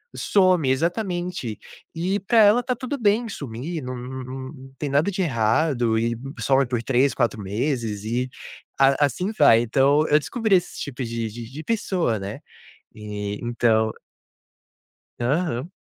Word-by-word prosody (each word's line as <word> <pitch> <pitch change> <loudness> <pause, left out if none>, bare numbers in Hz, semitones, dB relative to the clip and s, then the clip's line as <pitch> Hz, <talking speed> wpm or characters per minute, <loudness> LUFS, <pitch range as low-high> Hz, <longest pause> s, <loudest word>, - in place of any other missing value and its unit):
some 185 -8 +3
exatamente. 175 - -2 0.4
E 185 +5 0
para 230 +4 +1
ela 215 +3 +6
está 250 +1 -1
tudo 255 +4 -4
bem 220 +2 +2
sumir, 145 - -5
não 125 0 -5
não 130 +1 -6 0.3
não 135 -1 -13
tem 150 - -2
nada 145 +8 +2
de 190 0 -2
errado 120 -3 +1
e 115 +1 0 0.2
some 135 0 +3
por 120 -2 -1
3, 135 +2 +2
4 115 -4 0
meses 110 0 -2
e 125 +3 -1 0.5
a 135 +1 +5
assim 180 - -2
vai. 115 -6 +6
Então, 140 +5 +3
eu 150 - +5
descobri 220 - +1
esse 180 - -1
tipo 135 -2 -5
de 115 -1 -3
de 115 +2 -9
de 150 +3 -7
pessoa, 180 - 0
né. 100 +1 -6 0.6
E 105 -1 -5
então 115 -2 +2 1.3
Aham. 140 +3 -1
135 Hz, 150 wpm, -23 LUFS, 115-175 Hz, 1.3 s, ela